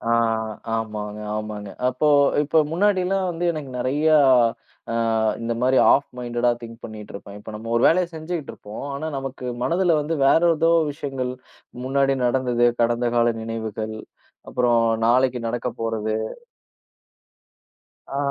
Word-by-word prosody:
ஆ, 115 - -1 0.6
ஆமாங்க, 105 -2 -4 0.2
ஆமாங்க. 105 -1 -5 0.2
அப்போ 130 +4 0 0.4
இப்போ 150 +2 +2
முன்னாடிலாம் 190 0 +1
வந்து 170 0 -4
எனக்கு 150 -4 -6
நிறைய 135 +5 0 0.9
அ, - - -2 0.5
இந்த 115 0 -2
மாரி 130 +1 +3
ஆஃப் 140 - +4
மைன்டேடா 120 0 0
திங் 115 -1 -10
பண்ணிக்கிட்டு 105 -2 -9
இருப்பேன். 100 0 -9
இப்போ, 105 - -10
நம்ம 110 +2 -7
ஒரு 115 - +2
வேலையை 180 +2 +4
செஞ்சுகிட்டு 160 -1 -5
இருப்போம். 105 +1 -9
ஆனா, 145 +3 -4
நமக்கு 135 -1 -6 0.2
மனதுல 170 +2 +2
வந்து 150 +3 -2
வேற 150 - +5 0.2
ஏதோ 165 +1 +3 0.2
விஷயங்கள் 135 -3 -4 0.5
முன்னாடி 135 +1 +2
நடந்தது, 125 -1 +2
கடந்தகால 120 0 +2
நினைவுகள், 110 -1 -4 0.5
அப்புறம் 120 -2 +2 0.2
நாளைக்கு 125 +1 +3
நடக்கப்போறது 115 -2 -2 1.9
ஆ. 135 - -4
125 Hz, 125 wpm, -23 LUFS, 115-145 Hz, 1.9 s, வேற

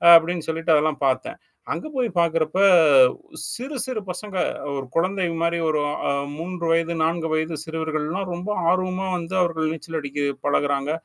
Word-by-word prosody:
அப்படின்னு 165 0 +3
சொல்லிட்டு 165 +1 0
அதெல்லாம் 150 -1 +1
பார்த்தேன். 310 - -1 0.4
அங்க 310 - -5
போய் 250 -2 +1
பார்க்கறப்ப 165 +1 +1 0.9
சிறு, 265 +5 -6
சிறு 250 -5 -3
பசங்க 195 +1 -6 0.4
ஒரு 135 -1 -4
குழந்தை 185 +2 +1
மாரி 170 0 +1
ஒரு 155 - +1 0.3
அ - - +3 0.3
3 175 +1 -5
வயது, 165 0 +1
4 165 0 0
வயது, 160 +1 -1
சிறுவர்கள்லாம் 160 +3 -3
ரொம்ப 175 +4 -5 0.2
ஆர்வமா 185 +1 0
வந்து 175 +2 -5
அவர்கள் 160 -2 0
நீச்சல் 165 0 -6
அடிக்க 145 0 -4 0.2
பழகுறாங்க. 145 0 +1
165 Hz, 145 wpm, -23 LUFS, 155-185 Hz, 0.9 s, அப்படின்னு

